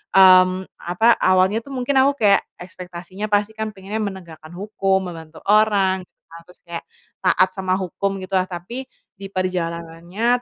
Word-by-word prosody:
mmm, 185 0 +6
apa, 200 +7 +2
awalnya 185 +4 +3
tuh 275 +3 -9
mungkin 265 +1 +2
aku 280 +1 +2
kayak 200 - +5 0.2
ekspektasinya 180 +3 -8
pasti 205 +1 +1
kan 220 0 -3
pengennya 205 +1 -5
menegakkan 175 -5 -7
hukum, 195 -2 -1
membantu 160 -1 -12
orang 200 -3 +3
gitu - - -56
kan, 165 - -10
terus 180 - -18
kayak 170 -1 -6 0.4
taat 185 0 +3
sama 185 -1 -1
hukum, 195 +1 -3
gitu 185 - -9
lah. 185 -1 +1
Tapi 210 +9 -6 0.3
di 195 0 -9
perjalanannya 180 +5 -2
190 Hz, 155 wpm, -21 LUFS, 180-210 Hz, 0.4 s, mmm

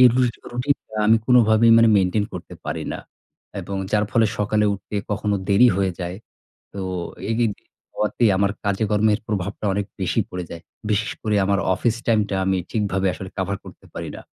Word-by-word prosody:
এই 125 - +10
রুটি 125 -3 +1
রুটিন 130 +4 +1
টা 110 - -9
আমি 110 +1 +6
কোনভাবেই 115 -2 +5
মানে 115 0 +6
মেইনটেইন 100 +2 +2
করতে - - -8
পারি - - -3
না। - - -5 0.6
এবং 100 - -5 0.2
যার 105 0 +3
ফলে 115 -1 +4
সকালে 105 +1 +1
উঠতে 105 +1 -7
কখনো 105 0 0
দেরি 105 +5 +6
হয়ে 95 -2 +1
যায়। 90 +1 -4 0.6
তো 100 - -5 0.5
এই - - +1
এগিন 115 -2 +1 0.4
হওয়াতে 105 +3 -1
আমার 100 0 +2
কাজে 100 +1 0
কর্মের 105 0 +3
প্রভাবটা 100 0 -3
অনেক 100 0 -1 0.2
বেশি 95 +5 0
পড়ে 90 -1 -4
যায়। 85 - -7 0.3
বিশেষ 105 +1 0
করে 105 -1 0
আমার 100 0 +2 0.2
অফিস 115 +2 0
টাইম 115 -2 +4
টা 100 - -1
আমি 95 -1 +2
ঠিকভাবে 95 -3 0
আসলে 95 - -7
কাভার 95 +1 -1
করতে - - -13
পারি - - -5
না। - - -9
105 Hz, 190 wpm, -22 LUFS, 100-110 Hz, 0.6 s, এই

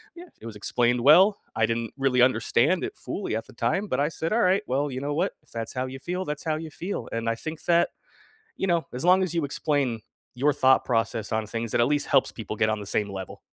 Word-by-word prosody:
yeah, 350 +1 -11
it - - -11
was 110 -2 -7
explained 120 +3 +1
well, 185 - +6 0.2
I 110 0 +3
didn't 115 0 -2
really 130 -2 +2
understand 130 +7 +3
it - - -7
fully 190 - -4
at 115 0 -4
the - - -15
time, 170 - -1
but - - -1
I 145 - +2
said, 165 +2 -4
"Alright. 195 -4 +3
Well, 140 +3 0
you 130 0 -5
know 145 +1 -2
what? 180 +6 0
If - - -24
that's 115 -1 -5
how 130 0 -2
you 135 +1 -8
feel, 180 +5 -3
that's 150 -1 -5
how 155 -1 +1
you 160 0 -6
feel," 185 +7 -5
and 115 0 -3
I 115 - 0
think 160 +6 -7
that, 170 0 +3 0.7
you 195 - -1
know, 170 -2 +1
as 125 +5 -5
long 185 +1 +5
as 175 -2 -2
you 160 - +1
explain 140 -5 -1 0.3
your 145 +4 +2
thought 130 0 +4
process 115 -2 -1
on 110 -1 0
things, 115 +1 -4
it - - +3
at 120 - +4
least 145 0 0
helps 135 -2 +3
people 110 -1 -6
get 110 - +2
on 110 -1 -1
the 100 - -8
same 105 0 -1
level. 95 -1 -7
135 Hz, 255 wpm, -26 LUFS, 115-165 Hz, 0.7 s, well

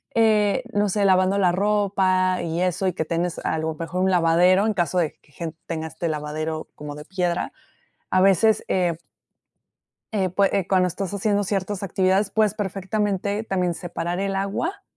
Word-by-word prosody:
eh, 220 +1 +3
no 205 0 +2
sé, 205 +2 0
lavando 185 +1 +3
la 180 -3 +4
ropa, 190 -1 +1
y 165 +1 -2
eso. 185 +1 0
Y 180 - 0
que 160 - -2
tienes, 170 +1 -2
a - - 0
lo 160 0 -2
mejor 165 +3 -3
un 190 - +2
lavadero. 180 +3 +4
En 220 - +1
caso 180 0 +1
de 160 -3 0
que, 145 - -27
gen 160 +1 -6
tenga 160 -1 -3
este 160 +2 -4
lavadero, 155 +1 -3
como 150 0 -7
de 150 +1 -9
piedra. 180 -2 -2 0.6
A 185 - +3
veces, 195 +3 +4
eh. 175 -3 +1 1.2
Eh, 195 -3 +1
pue 195 +2 +2
eh, 190 - 0
cuando 185 -1 +3
estás 195 +2 -4
haciendo 205 0 +1
ciertas 195 0 -2
actividades 190 +1 +1
puedes 215 -1 +2
perfectamente 205 0 -2
también 180 -4 0
separar 175 0 -4
el 195 0 -1
agua, 205 - -2
185 Hz, 175 wpm, -23 LUFS, 170-200 Hz, 1.2 s, la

